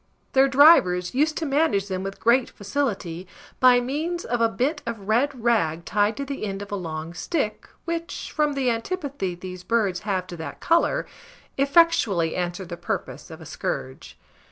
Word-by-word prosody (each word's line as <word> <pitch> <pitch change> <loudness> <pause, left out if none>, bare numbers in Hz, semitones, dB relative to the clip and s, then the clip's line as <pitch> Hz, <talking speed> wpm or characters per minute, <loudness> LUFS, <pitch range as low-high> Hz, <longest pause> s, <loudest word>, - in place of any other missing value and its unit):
Their 270 +1 +5
drivers 260 - +5
used 305 +4 +1
to 325 - -2
manage 275 -9 +1
them 185 -2 -3
with 195 +1 -6
great 240 +2 +3
facility, 200 -7 -3 0.3
by 250 -1 +6
means 310 +8 -3
of 240 0 -1
a 230 - +4
bit 270 +8 -1
of 225 -4 -6
red 245 +3 +1
rag 170 -9 +1
tied 205 +2 +1
to 280 - -3
the 275 -3 -5
end 200 -1 -3
of 205 - -12
a - - -1
long 165 -3 -5
stick, 215 - -3 0.2
which, 335 0 -4
from 300 -1 +2
the 265 -3 +1
antipathy 245 - -3
these 180 0 -8
birds 205 -6 +1
have 190 -2 -2
to 175 - -9
that 160 - -7
colour, 335 +1 +2 0.5
effectually 275 - +3
answered 180 0 -3
the 175 - -6
purpose - - -5
of - - -10
a - - -10
scourge. 65 0 -5
225 Hz, 175 wpm, -24 LUFS, 185-280 Hz, 0.5 s, by